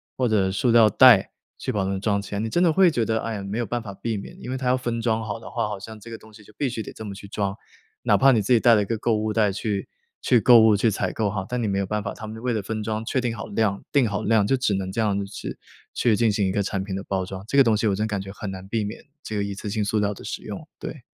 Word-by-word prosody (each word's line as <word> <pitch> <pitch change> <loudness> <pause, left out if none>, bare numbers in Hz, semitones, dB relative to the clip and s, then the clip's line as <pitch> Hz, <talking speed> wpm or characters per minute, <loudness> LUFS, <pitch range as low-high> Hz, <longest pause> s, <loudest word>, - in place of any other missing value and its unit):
或 130 - +1
者 100 -3 +2
塑 100 +6 0
料 115 -1 +7
袋 115 -4 +6 0.3
去 - - -2
把 100 - -1
它 95 - -1
们 95 - -2
装 100 -1 +1
起 100 +1 -7
来， - - -1
你 110 - -2
真 175 - +2
的 170 - +4
会 185 0 +5
觉 120 -6 0
得， 110 0 0
哎 115 - -3
呀， 100 - -5
没 100 +3 -4
有 120 - 0
办 120 +1 -3
法 105 -3 -8
避 110 +4 -3
免， 100 - -9
因 125 - -6
为 130 - -2
它 130 -1 -3
要 125 +1 +3
分 120 -2 -3
装 110 -1 0
好 110 +1 -4
的 110 - -10
话， 115 -3 -1
好 105 - -5
像 110 +2 -9
这 115 +2 -11
个 - - -5
东 110 - -17
西 105 0 -15
就 105 - -18
必 140 - 0
须 115 -2 -4
得 - - -9
这 - - -9
么 100 -1 -6
去 100 +1 -10
装。 100 -1 -2 0.5
哪 - - +4
怕 135 0 +6
你 115 -4 +3
自 115 - +2
己 120 - +5
带 115 +1 +6
了 105 - +3
一 - - -4
个 115 - -2
购 115 0 +1
物 110 0 -1
袋 105 -2 +2
去 100 0 -3 0.3
去 125 - +4
购 120 +2 +7
物、 110 -2 +5
去 110 +3 +2
采 100 - -1
购 110 -2 -1
哈， 100 -2 -3
但 125 0 -2
你 - - 0
没 100 -1 0
有 100 - 0
办 105 +1 -2
法， 100 - -4
他 110 - -8
们 110 +1 -8
为 125 -1 0
了 110 - -1
分 110 +2 -4
装 110 +1 -2
确 130 - 0
定 120 -2 -2
好 - - -6
量， 100 -2 0
定 140 -4 +3
好 100 0 -2
量 110 -2 +3
就 135 - +3
只 125 -5 +1
能 95 -1 -3
这 115 - -1
样 105 -3 +1
子 100 - -2
去 100 - -7 0.4
去 115 -3 +3
进 115 +1 +2
行 100 -1 +1
一 - - 0
个 100 - 0
产 95 -1 -2
品 95 -1 -5
的 95 - -4
包 95 -1 -2
装， 95 0 -7
这 140 - 0
个 135 - +8
东 115 -3 +3
西 105 +1 +1
我 100 - +2
真 105 +2 -1
感 105 -3 -2
觉 95 0 -8
很 100 0 -6
难 95 0 -8
避 110 +1 -1
免， 105 +3 -7 0.2
这 110 - -5
个 100 - 0
一 100 0 -4
次 100 - -7
性 105 +1 -1
塑 105 +2 0
料 105 0 0
的 - - -12
使 - - -5
用， - - -7
对。 - - -7
110 Hz, 365 characters per minute, -24 LUFS, 100-115 Hz, 0.5 s, 个